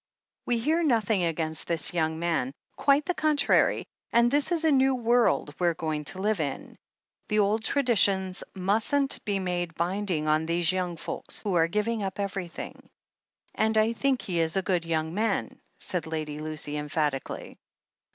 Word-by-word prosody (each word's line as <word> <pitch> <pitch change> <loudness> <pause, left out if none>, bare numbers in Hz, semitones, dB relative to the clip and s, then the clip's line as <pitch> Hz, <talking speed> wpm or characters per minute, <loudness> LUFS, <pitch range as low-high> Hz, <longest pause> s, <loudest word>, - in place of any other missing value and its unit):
We 240 - +2
hear 310 +9 +1
nothing 225 - +2
against 160 -1 -2
this 170 0 0
young 160 -2 0
man 165 -6 -1
— - - -45
quite 285 +1 +3
the 360 - 0
contrary 305 -3 +2
— - - -56
and 235 +1 +4
this 290 +4 +1
is 330 -2 +1
a 315 - +5
new 265 -1 +4
world 235 -10 +2
we're 175 -2 +2
going 155 -2 -3
to 185 - -3
live 210 0 +1
in. 140 -3 -4 0.5
The 210 - 0
old 210 +2 +2
traditions 200 -8 +2
mustn't 220 +9 +1
be 205 -1 0
made 175 -3 -2
binding 175 -2 -1
on 155 +1 +2
these 170 0 +2
yotmg 180 -2 -2
folk, - - -5 0.2
who 200 - -1
are 165 -2 +4
giving 210 +5 -1
up 195 0 -4
everything. 195 -3 -5 0.6
And 220 0 +1
I 220 +1 +3
think 265 +2 0
he 180 -6 -1
is 165 +1 +1
a 190 - +1
good 180 -3 0
young 160 -1 -1
man," 215 +1 -1 0.2
said 175 -4 -3
Lady 155 -2 -4
Lucy 155 -1 -4
emphatically. 150 -2 -3
190 Hz, 170 wpm, -27 LUFS, 160-225 Hz, 0.6 s, a